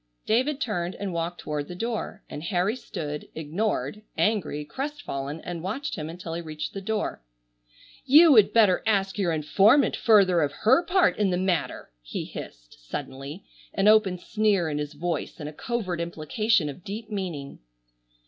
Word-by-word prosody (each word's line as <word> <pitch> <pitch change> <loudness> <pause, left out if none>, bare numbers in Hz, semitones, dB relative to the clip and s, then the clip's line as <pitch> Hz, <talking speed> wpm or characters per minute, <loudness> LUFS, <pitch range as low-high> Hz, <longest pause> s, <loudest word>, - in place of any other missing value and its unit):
David 260 +6 +1
turned 185 - -2
and 195 -2 -4
walked 170 0 -3
toward 150 -1 -3
the 180 - -7
door, 225 0 -4
and 145 - -7
Harry 185 +5 +1
stood, 150 -11 -6
ignored, 200 +7 -2 0.2
angry, 175 -9 0
crestfallen, 160 - -5
and 175 -2 -5
watched 220 - -3
him 155 -1 -5
until 170 0 -7
he 170 - -3
reached 155 -2 -6
the 195 - -5
door. 210 - -2 0.8
"You 315 +4 +7
would 215 -7 +7
better 210 -5 +4
ask 195 -2 +1
your 180 -4 +1
informant 195 - +4
further 195 -6 +5
of 145 -1 0
her 260 +10 +5
part 370 0 +3
in 205 -2 +2
the 180 - +1
matter!" 180 - -1
he - - -5
hissed, - - -10
suddenly, 135 - -7 0.3
an 195 +1 +2
open 215 -4 +5
sneer 200 -3 +1
in 150 -1 -2
his 150 0 -4
voice 165 +2 -3
and 150 - -5
a 150 - -7
covert 185 -3 -3
implication 170 +3 0
of 145 +5 -7
deep 215 +2 -7
meaning. 175 -9 -5
185 Hz, 165 wpm, -26 LUFS, 155-215 Hz, 0.8 s, You